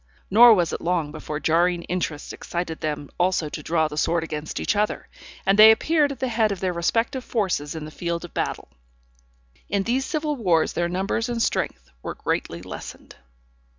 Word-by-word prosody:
Nor 230 +2 +9
was 175 -4 0
it - - -4
long 165 -4 0
before 150 0 -5
jarring 170 +2 +2
interests 170 -5 -3
excited 170 -2 -5
them 150 -2 -4
also 175 -3 +1
to 150 - -6
draw 160 +1 +1
the 150 -1 -8
sword 170 0 +1
against 155 -1 -5
each - - 0
other, 210 +1 -1 0.4
and 195 +2 +3
they 215 +1 +11
appeared 295 +6 +3
at 270 - -7
the 260 - -1
head 220 -3 +1
of 195 - -3
their 185 -1 -1
respective 230 - 0
forces 185 -12 -1
in 155 -1 -5
the 155 - -9
field 170 +1 -3
of 175 - -13
battle. - - -3 1.0
In 200 0 +1
these 250 +5 0
civil 305 0 -2
wars 180 - +1
their 175 0 -1
numbers 195 +6 -1
and 240 -1 -2
strength 225 - -1
were - - -5
greatly 85 +1 -3
lessened. 95 - -9
180 Hz, 185 wpm, -24 LUFS, 160-225 Hz, 1.0 s, they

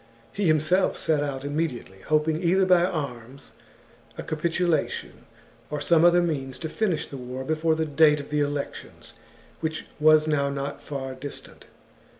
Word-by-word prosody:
He 205 - -1
himself 155 +4 +2
set 155 -2 +1
out 140 -2 -3
immediately, 145 -10 -3
hoping 155 +1 +1
either 185 +2 +3
by 180 -2 +5
arms, 135 -6 -5 0.7
a - - -5
capitulation, 170 +2 -1 0.4
or 150 - -3
some 165 +2 +3
other 175 0 +5
means 135 -6 -3
to 160 - -5
finish 185 -3 -1
the 140 - -9
war 125 +1 -6
before 160 +2 +1
the 160 0 -1
date 150 0 +4
of 145 - -9
the 150 - +1
elections, 145 -1 -4 0.5
which 160 -1 -3
was 155 0 +5
now 140 -2 +1
not 140 0 -4
far 135 -2 -5
distant. 135 +2 -9
155 Hz, 155 wpm, -25 LUFS, 140-165 Hz, 0.7 s, by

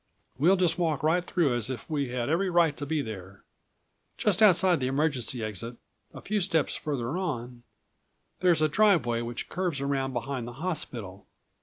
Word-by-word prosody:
We'll 175 +7 +5
just 180 -2 +1
walk 160 -5 0
right 165 +3 +2
through 170 -7 +1
as 120 -1 -2
if 130 - -6
we 145 -5 -1
had 120 -1 -2
every 180 +5 +1
right 170 -4 +3
to 145 - -6
be 155 -1 0
there. 95 -3 -9 0.7
Just 205 -1 +1
outside 185 -4 +5
the 130 - -1
emergency 130 -4 0
exit, 110 +3 -5 0.4
a - - -10
few 210 0 -1
steps 165 -5 +1
further 140 -2 -3
on, 125 -9 -4 0.8
there's 175 -4 +3
a - - +5
driveway 155 - +3
which 120 0 -5
curves 180 -5 -2
around 135 -1 -1
behind 120 0 -3
the 120 - -7
hospital. 120 - -4
145 Hz, 170 wpm, -28 LUFS, 120-175 Hz, 0.8 s, We'll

